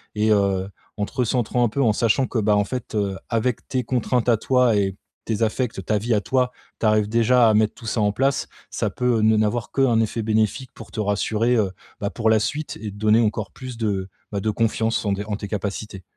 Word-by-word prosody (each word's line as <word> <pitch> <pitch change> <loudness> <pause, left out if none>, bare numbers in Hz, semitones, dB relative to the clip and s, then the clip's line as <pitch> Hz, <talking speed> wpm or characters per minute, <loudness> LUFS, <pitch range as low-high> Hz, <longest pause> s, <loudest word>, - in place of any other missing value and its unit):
et 110 +1 +2
heu, 100 -2 +2 0.3
en 105 - 0
te - - -13
recentrant 125 0 +1
un 115 - +1
peu 140 +5 -1
en 110 -3 +3
sachant 115 +4 +2
que, 120 - -1
bah, 105 -1 +3
en 105 - +3
fait, 115 +1 -5
heu, 100 -2 -1
avec 115 0 -1
tes 130 -1 -1
contraintes 125 0 0
à 115 - +4
toi 125 -1 +3
et 95 -2 0 0.3
tes 110 0 -2
affectes, 110 -3 -2
ta 105 - +1
vie 115 +3 0
à 105 - +2
toi, 125 +1 +1 0.3
tu - - -1
arrives 105 -1 +3
déjà 115 +1 +4
à - - +3
mettre 105 0 +3
tout 115 - -13
ça 110 0 -1
en 105 -1 +3
place, 135 +5 0 0.2
ça - - -1
peut 125 -3 0
ne 110 0 +4
n'avoir 110 +2 0
que 135 - 0
un 120 -4 +4
effet 115 +1 -1
bénéfique 110 +4 0
pour - - -12
te 110 - -6
rassurer, 110 +3 +1
heu, 100 -4 +1 0.3
bah 100 - 0
pour 110 -1 0
la 110 - +5
suite 145 +8 -3
et 110 - -4
te - - -12
donner 110 +2 +4
encore 110 -1 -1
plus 130 -3 -8
de, 100 -4 -2 0.2
bah, 100 - -2
de 110 - 0
confiance 115 +1 0
en 100 - +1
des 100 +1 -3
en 105 -1 -2
tes 100 - -6
capacités. 100 -1 -4
110 Hz, 240 wpm, -23 LUFS, 105-120 Hz, 0.3 s, la